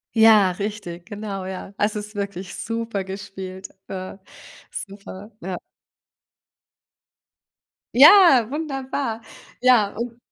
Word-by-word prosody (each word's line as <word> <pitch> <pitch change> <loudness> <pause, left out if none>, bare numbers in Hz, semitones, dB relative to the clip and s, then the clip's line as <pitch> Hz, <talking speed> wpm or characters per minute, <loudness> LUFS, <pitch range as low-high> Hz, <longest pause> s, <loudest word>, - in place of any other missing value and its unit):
Ja, 220 -4 +6
richtig, 180 -3 -6
genau, 205 -3 -6
ja. 190 +1 -7
Es 210 +1 0
ist 210 +1 -6
wirklich 200 -2 -5
super 230 -4 -3
gespielt, 190 -1 -8 0.2
äh, 185 0 -6 0.5
super, 200 +1 -9
ja. 185 +1 -5 2.4
Ja, 290 - +8
wunderbar. 270 -5 -3 0.4
Ja, 245 -5 +4
und 235 0 -5
205 Hz, 95 wpm, -22 LUFS, 190-230 Hz, 2.4 s, Ja